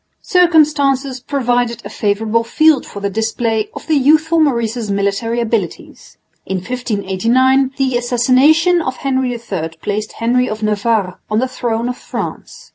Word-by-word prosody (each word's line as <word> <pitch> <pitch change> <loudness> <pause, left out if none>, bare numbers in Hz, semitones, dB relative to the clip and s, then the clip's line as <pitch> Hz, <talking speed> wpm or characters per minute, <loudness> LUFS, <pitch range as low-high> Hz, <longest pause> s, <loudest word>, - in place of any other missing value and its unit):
Circumstances 295 -7 +2
provided 245 -3 -1
a - - -6
favourable 215 +2 0
field 310 +4 +2
for 200 - -8
the 200 - -1
display 225 +1 -1
of - - -8
the 315 - 0
youthful 310 +4 +3
Maurice's 235 -6 0
military 200 +4 -1
abilities. 220 -7 -4 0.3
In 190 - -3
1589 245 +5 0
the 260 -3 +1
assassination 265 +9 +3
of 260 -4 -4
Henry 260 -2 -1
III 185 -9 -5
placed 210 +1 -3
Henry 250 +2 0
of 215 0 -5
Navarre 210 -3 0
on 215 - 0
the 255 +3 +1
throne 235 -2 -2
of 250 - -4
France. - - -7
240 Hz, 140 wpm, -16 LUFS, 215-270 Hz, 0.3 s, youthful